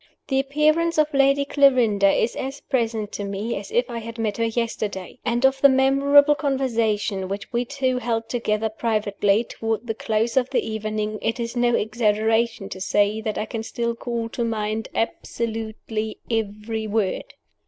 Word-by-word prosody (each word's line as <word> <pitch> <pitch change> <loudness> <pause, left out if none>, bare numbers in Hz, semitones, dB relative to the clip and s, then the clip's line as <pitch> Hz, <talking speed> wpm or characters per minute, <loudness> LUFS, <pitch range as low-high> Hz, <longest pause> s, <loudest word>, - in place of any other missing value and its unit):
The 270 -1 +2
appearance 305 +5 +2
of 305 -1 +2
Lady 275 0 +4
Clarinda 250 -9 +4
is 225 - +1
as 270 +2 -4
present 225 -5 -1
to 205 - -4
me 200 +4 -3
as - - -6
if 475 +3 +1
I 235 - -5
had 230 +1 -8
met 215 -3 -1
her 230 - +1
yesterday; 225 -3 -3
and 240 +2 +1
of 265 0 +3
the 280 - +8
memorable 275 +2 +5
conversation 230 -9 0
which 200 +4 -6
we 240 +1 +1
two 260 -1 -1
held 230 -2 -2
together 220 -2 0
privately, 215 -1 +1
toward 225 -1 -3
the 225 - -2
close 225 +2 -1
of 255 -1 +3
the 270 - 0
evening, 215 -1 -3
it 230 +2 -1
is 235 +1 -3
no 240 -1 +3
exaggeration 220 -1 +1
to 185 - -7
say 205 +3 +1
that 215 -1 -3
I 215 - -1
can 225 -1 -4
still 235 +1 -2
call 230 -1 -3
to 235 - -3
mind 220 -1 -2
almost 225 - -3 0.9
every 220 0 -2
word. 210 -3 -2
230 Hz, 170 wpm, -23 LUFS, 215-260 Hz, 0.9 s, the